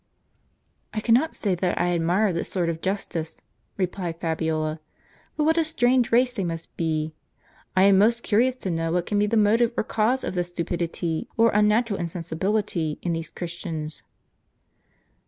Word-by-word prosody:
"I - - +1
cannot 245 +8 +2
say 200 -3 0
that 180 0 -1
I 175 0 +2
admire 175 +4 +2
this 170 - -3
sort 175 -3 0
of 165 -1 -4
justice," 185 -4 -3 0.4
replied 180 -3 -3
Fabiola; 160 -1 -1 0.3
" - - -33
but 305 - +2
what 320 +2 +3
a - - +4
strange 255 -5 +2
race 250 +2 +4
they 200 - -2
must 165 -1 -5
be! 155 -1 -1 0.6
1 190 +1 +5
am 200 -1 +6
most 235 +3 +3
curious 245 +4 +2
to 195 -7 -4
know 165 0 -1
what 175 0 0
can 205 - 0
be 210 - +3
the 225 +2 +1
motive 225 +3 +4
or - - +2
cause 225 +5 +1
of - - -3
this 175 -1 -2
stupidity, 170 -1 -3
or 230 0 +5
unnatural 210 +1 +2
insensibility, 170 0 -2
in 175 - 0
these 165 -1 -4
Christians? 165 -3 -6
185 Hz, 170 wpm, -25 LUFS, 165-220 Hz, 0.6 s, am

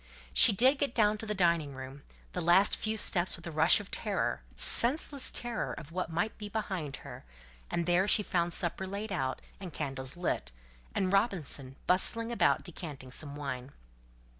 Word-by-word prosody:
She - - +9
did 255 +7 +3
get 280 -4 -1
down 215 -2 +2
to 220 - -5
the 210 - -2
dining 170 -6 +1
room, 135 +1 -9 0.3
the - - -3
last 175 +4 +4
few 220 0 -3
steps 185 -3 +2
with 170 - -13
a 170 - -6
rush 160 +2 +4
of 205 - -11
terror, - - -2
senseless 275 +2 +4
terror 240 -1 -3
of 160 0 -10
what 180 -1 -3
might 175 +7 -2
be 210 -1 -7
behind 190 -9 -4
her; - - -10 0.5
and 170 - -2
there 180 +3 +2
she 210 0 +2
found 175 -2 -1
supper 175 +3 +1
laid 200 +2 -6
out, 130 -8 -3 0.2
and 185 -3 -8
candles 135 -1 -5
lit, 175 - -2 0.4
and 190 -1 0
Robinson 165 - -1
bustling 230 +5 +2
about 235 - +2
decanting 150 -7 -8
some 145 +2 -4
wine. 140 -2 -6
180 Hz, 175 wpm, -30 LUFS, 150-210 Hz, 0.5 s, She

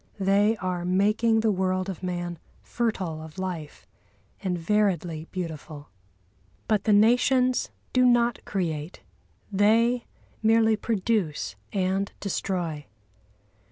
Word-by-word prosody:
They 200 +3 +3
are 185 -2 -3
making 215 +5 +2
the 220 -1 +2
world 185 -1 0
of 190 -3 -5
man 175 -2 -4 0.2
fertile 190 -9 -2
of 160 +1 -11
life 180 -5 -5 0.6
and 180 -2 -1
variedly 175 -4 0
beautiful. 160 -5 -6 0.8
But 215 -2 +1
the 215 - +3
nations 250 +4 +3 0.2
do 255 - +4
not 240 -1 +3
create, 165 -4 -3 0.5
they 230 +4 +3 0.3
merely 225 0 +4
produce 205 - -1 0.2
and 195 +1 0
destroy. 175 -6 -3
195 Hz, 105 wpm, -26 LUFS, 175-220 Hz, 0.8 s, do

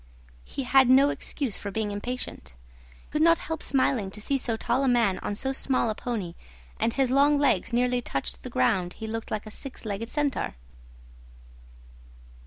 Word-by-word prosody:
He 275 - -5
had 260 0 +5
no 275 +2 +6
excuse 265 -8 -3
for 205 - -5
being 210 +1 -2
impatient. 205 - -5 0.3
I - - -24
could 300 - 0
not 335 +1 +6
help 320 -1 -4
smiling 260 -6 +2
to 200 - -7
see 275 +6 0
so 230 -3 -1
tall 245 +4 0
a - - +2
man 230 -7 +3
on 205 - -3
so 265 +5 -2
small 255 -4 +1
a - - -1
pony, 215 -7 -4 0.5
and 230 - +2
as - - -10
his 265 -2 +2
long 285 +2 +5
legs 270 -10 +2
nearly 245 +1 +2
touched 100 - -3
the - - -7
ground 175 +8 +1
he 220 - -7
looked 225 +1 -4
like 215 0 -3
a 215 - -9
six 265 +1 -8
legged 215 +2 -4
centaur. 290 - -1
240 Hz, 190 wpm, -27 LUFS, 205-270 Hz, 0.5 s, no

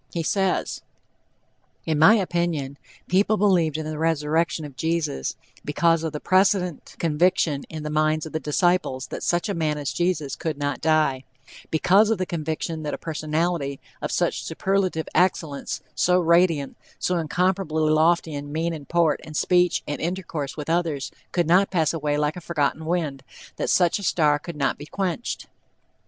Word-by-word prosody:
He 170 - -2
says: 190 +2 0 1.0
"In 155 -2 0
my 160 +8 +8
opinion, 170 -8 -1 0.3
people 205 +4 +3
believed 175 -7 +2
in 155 - -4
the 155 0 -4
resurrection 160 0 0
of 140 -3 -10
Jesus 160 - -1 0.3
because 165 +2 +2
of 160 - -2
the 150 - -5
precedent 185 -2 +1
conviction 160 -2 +1
in 155 -1 -6
the 150 - -4
minds 155 0 +1
of 160 - -8
the 155 - -1
disciples 155 -4 +1
that - - -6
such 175 +3 0
a 200 - -1
man 155 -4 -1
as 140 -2 -3
Jesus 170 -5 -1
could 160 -4 -3
not 145 0 -2
die, 155 -4 +2 0.5
because 195 +7 +4
of 225 - +2
the 185 - -1
conviction 160 -1 -3
that 150 -1 -3
a - - -8
personality 155 -2 -2 0.2
of - - -3
such - - 0
superlative 190 -4 -1
excellence, 165 -5 0
so 180 0 +3
radiant, 170 -4 +2 0.2
so 180 -1 0
incomparably 165 -1 0
lofty 160 +1 +3
in 145 0 -6
mien 165 +2 -1
and 150 -3 -9
port 170 -2 +2
and 155 -1 -6
speech 180 -1 +2
and 145 - -4
intercourse 165 -5 -3
with 150 - -5
others, 160 -5 -1 0.2
could 175 -1 +1
not 180 +5 +4
pass 165 -4 +1
away 150 -2 -1
like 150 +1 0
a 180 - -7
forgotten 155 -1 -1
wind, 160 -5 -1 0.4
that - - -2
such 175 +2 +3
a - - -8
star 150 -5 +2
could 170 +2 -8
not 140 -1 -1
be 145 - -9
quenched." 195 +5 -3
160 Hz, 170 wpm, -24 LUFS, 150-175 Hz, 1.0 s, my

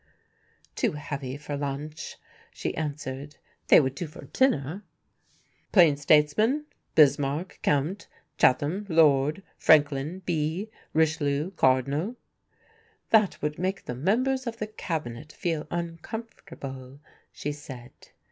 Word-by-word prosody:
"Too - - +1
heavy 140 -3 -5
for 145 0 -5
luncheon," 145 +2 -5 0.3
she - - -4
answered, 145 -2 -5 0.3
"they - - +8
would 135 -3 0
do 170 +4 -5
for 155 - -12
dinner." 180 - +1 0.9
"Plain 170 -7 +6
statesman? 155 - +3 0.3
Bismarck, 145 +2 +3
Count; 150 +8 0 0.3
Chatham, 155 +10 +2
Lord; 155 +1 +4 0.2
Franklin, 150 +3 +3
B; 170 +5 -1 0.2
Richelieu, 155 0 +1
Cardinal." 140 - +1 1.0
"That 215 -3 +4
would 150 +1 -2
make 190 +2 -2
the - - -4
members 250 - +1
of 230 -1 -4
the 215 - -2
Cabinet 155 - -5
feel 160 -3 -3
uncomfortable," 165 - -7 0.3
she 145 - -4
said. 130 -4 -9
150 Hz, 110 wpm, -27 LUFS, 140-185 Hz, 1.0 s, they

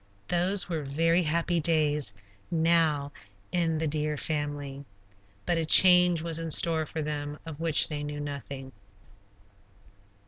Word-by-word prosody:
Those 180 +3 +1
were 165 -3 -3
very 165 +5 +1
happy 170 +1 0
days 150 -6 +1 0.4
now 160 -4 +1 0.4
in 165 -3 0
the 160 - -2
deer 150 0 -1
family. 145 -1 -4 0.6
But 170 -1 0
a 165 - -1
change 180 -2 +6
was 165 -1 -2
in 165 0 -4
store 160 -1 +1
for 160 - -4
them 145 0 -5
of 160 -2 -9
which 165 -2 +2
they 150 -2 -5
knew 145 0 -6
nothing. 140 -2 -7
155 Hz, 135 wpm, -27 LUFS, 145-165 Hz, 0.6 s, change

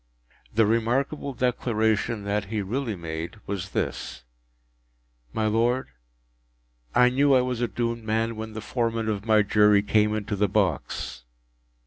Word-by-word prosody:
” - - -31
The 110 0 +5
remarkable 125 +6 0
declaration 110 -3 0
that 105 +1 -1
he 105 0 -2
really 115 +2 -2
made 85 +2 -5
was 95 -1 -4
this: - - -3 1.1
“_My 110 -1 0
Lord_, 120 +4 +1 1.1
I 125 0 +6
knew 140 +1 +4
I 130 - +5
was 125 -1 -2
a 120 - +2
doomed 115 +2 -2
man, 115 +1 0
when 110 0 -6
the 110 - -5
Foreman 115 0 -1
of 105 0 -3
my 110 -1 +5
Jury 105 0 +4
came 105 0 +2
into 105 0 -2
the 100 0 +1
box. 100 - -1
110 Hz, 145 wpm, -26 LUFS, 105-120 Hz, 1.1 s, I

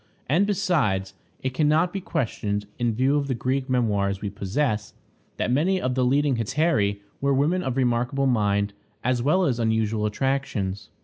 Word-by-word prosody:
And 175 +9 +3
besides, 140 - 0 0.3
it 130 -1 -1
can 150 +3 +2
not 160 +4 +2
be 195 - -3
questioned, 105 - -2
in 120 -2 0
view 135 +5 +2
of 140 -1 -1
the 130 - -1
Greek 130 +3 -1
memoirs 100 -6 +1
we 100 -1 -4
possess, 105 +2 -2 0.4
that - - 0
many 175 +9 +2
of 130 -6 -1
the 130 0 +1
leading 135 +1 +2
hetairæ 115 -4 +1 0.2
were 140 0 +2
women 160 +7 +2
of 130 -6 -2
remarkable 125 +2 +1
mind, 100 -4 +1 0.3
as 125 0 +1
well 180 +8 +3
as 125 -6 0
unusual 110 -1 +1
attractions. 110 -5 -2
125 Hz, 170 wpm, -25 LUFS, 105-145 Hz, 0.4 s, And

